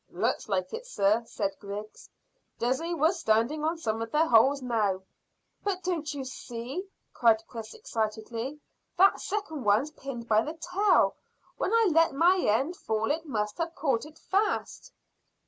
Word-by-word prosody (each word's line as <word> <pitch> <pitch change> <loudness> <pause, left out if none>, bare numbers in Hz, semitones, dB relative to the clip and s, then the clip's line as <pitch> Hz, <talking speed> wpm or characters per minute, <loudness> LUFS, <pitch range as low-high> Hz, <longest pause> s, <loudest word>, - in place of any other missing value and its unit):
"Looks - - -1
like 185 -2 -1
it, - - -6
sir," 210 - +2
said 200 -3 -3
Griggs. 205 +1 -8 0.5
"Dessay 265 +9 0
we're 320 +1 +4
standing 280 -2 +1
on 325 +2 0
some 225 -7 -2
of 225 - -3
their 310 +2 +3
holes 265 +4 +5
now." 215 -7 0 0.6
"But 385 -2 -2
don't 330 -5 -1
you 280 -3 -5
see?" 260 +7 -6 0.3
cried 225 -2 +4
Chris 225 - -8
excitedly; 230 - -3 0.4
"that 390 +2 +5
second 370 -9 -3
one's 215 +8 +3
pinned 260 -5 -7
by 215 -1 +4
the 305 +6 -4
tail. 395 +5 +2 0.4
When 380 - -1
I 455 -3 +4
let 325 -3 +4
my 350 +6 +5
end 270 +7 +1
fall 220 +2 -1
it 320 +2 -2
must 210 -3 -2
have 335 0 -2
caught 275 -2 0
it 310 +1 -16
fast." 420 +5 -1
270 Hz, 160 wpm, -28 LUFS, 220-330 Hz, 0.6 s, holes